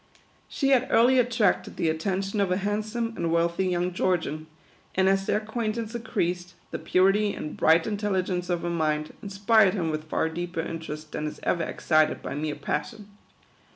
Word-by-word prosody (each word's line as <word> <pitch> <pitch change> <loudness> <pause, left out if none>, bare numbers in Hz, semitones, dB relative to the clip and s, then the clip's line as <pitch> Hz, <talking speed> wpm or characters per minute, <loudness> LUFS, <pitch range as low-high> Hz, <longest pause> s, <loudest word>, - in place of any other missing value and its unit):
She 275 - 0
had 260 -2 +4
early 250 +3 +5
attracted 230 -5 +1
the - - 0
attention 195 +5 -1
of 190 -2 +1
a 180 - +2
handsome 215 +3 -2
and 170 -1 -1
wealthy 170 +2 +1
young 180 0 0
Georgian; 160 -4 -1 0.5
and 190 0 +3
as 195 0 +2
their - - +2
acquaintance 220 +1 -3
increased, 180 -6 -2 0.2
the - - -4
purity 195 +3 +2
and 150 - -6
bright 165 +1 +4
intelli 205 -3 -1
gence 180 -1 -3
of 175 -1 -1
her 175 - -1
mind, 155 -2 -1
inspired 200 0 +3
him 165 -5 -1
with 155 0 -5
far 160 - +1
deeper 170 +1 -3
in 165 0 -5
terest 155 -1 -8
than 150 - -3
is 150 - -7
ever 170 - +1
excited 155 -1 +1
by - - -4
mere 150 +1 -2
passion. 200 +9 -4
185 Hz, 180 wpm, -26 LUFS, 165-210 Hz, 0.5 s, early